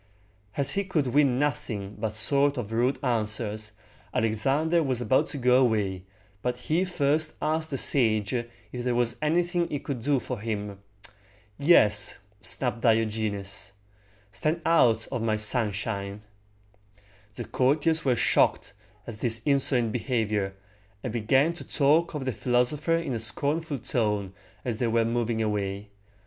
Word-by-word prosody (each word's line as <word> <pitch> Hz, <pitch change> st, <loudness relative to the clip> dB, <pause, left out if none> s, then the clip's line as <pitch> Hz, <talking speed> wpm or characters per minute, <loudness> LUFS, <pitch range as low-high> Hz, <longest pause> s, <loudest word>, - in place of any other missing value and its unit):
As 140 Hz, -1 st, +3 dB
he 200 Hz, -, 0 dB
could 175 Hz, -7 st, -1 dB
win 135 Hz, 0 st, +2 dB
nothing 125 Hz, -9 st, -2 dB
but 110 Hz, -1 st, -2 dB
short 140 Hz, +6 st, +2 dB
or 125 Hz, -, -1 dB
rude 115 Hz, +5 st, 0 dB
answers, 110 Hz, -3 st, -2 dB, 0.4 s
Alexander 135 Hz, +10 st, +1 dB
was 130 Hz, -5 st, -1 dB
about 120 Hz, +2 st, +2 dB
to -, -, -6 dB
go 125 Hz, 0 st, +4 dB
away, 100 Hz, -6 st, -1 dB, 0.4 s
but 125 Hz, 0 st, -2 dB
he 160 Hz, +8 st, 0 dB
first 155 Hz, -3 st, 0 dB
asked 160 Hz, +1 st, -1 dB
the 135 Hz, -, -3 dB
sage 110 Hz, -7 st, +3 dB
if 120 Hz, -2 st, -1 dB, 0.4 s
there 125 Hz, -1 st, 0 dB
was 120 Hz, -1 st, 0 dB
anything 175 Hz, +3 st, +1 dB
he 145 Hz, -, -2 dB
could 135 Hz, -3 st, -5 dB
do 140 Hz, +2 st, +1 dB
for 125 Hz, -2 st, -6 dB
him. 105 Hz, -2 st, -4 dB, 0.8 s
"Yes," 105 Hz, -, +4 dB, 0.2 s
snapped 120 Hz, +1 st, -1 dB
Diogenes; 105 Hz, -4 st, -1 dB, 0.6 s
"stand 155 Hz, -, -1 dB
out 115 Hz, -9 st, +3 dB
of 125 Hz, -4 st, -2 dB
my 110 Hz, -1 st, +1 dB
sunshine!" 105 Hz, -2 st, +1 dB, 1.1 s
The -, -, -6 dB
courtiers 150 Hz, +5 st, +1 dB
were 130 Hz, -3 st, +2 dB
shocked -, -, +1 dB, 0.3 s
at 105 Hz, -2 st, -9 dB
this 115 Hz, -2 st, 0 dB
insolent 130 Hz, -5 st, +3 dB
behavior, 110 Hz, -5 st, -1 dB, 0.5 s
and 120 Hz, -, -4 dB
began 130 Hz, +8 st, +2 dB
to 170 Hz, -, -9 dB
talk 155 Hz, +4 st, +2 dB
of 140 Hz, -3 st, -4 dB
the 130 Hz, -, 0 dB
philosopher 125 Hz, +7 st, 0 dB
in 165 Hz, -5 st, -2 dB
a 115 Hz, -, -2 dB
scornful 145 Hz, +7 st, 0 dB
tone 105 Hz, -5 st, -2 dB, 0.3 s
as 115 Hz, -3 st, -2 dB
they 120 Hz, -, +1 dB
were 115 Hz, 0 st, +2 dB
moving 115 Hz, -1 st, -1 dB
away. 100 Hz, -1 st, -3 dB
120 Hz, 145 wpm, -26 LUFS, 110-145 Hz, 1.1 s, go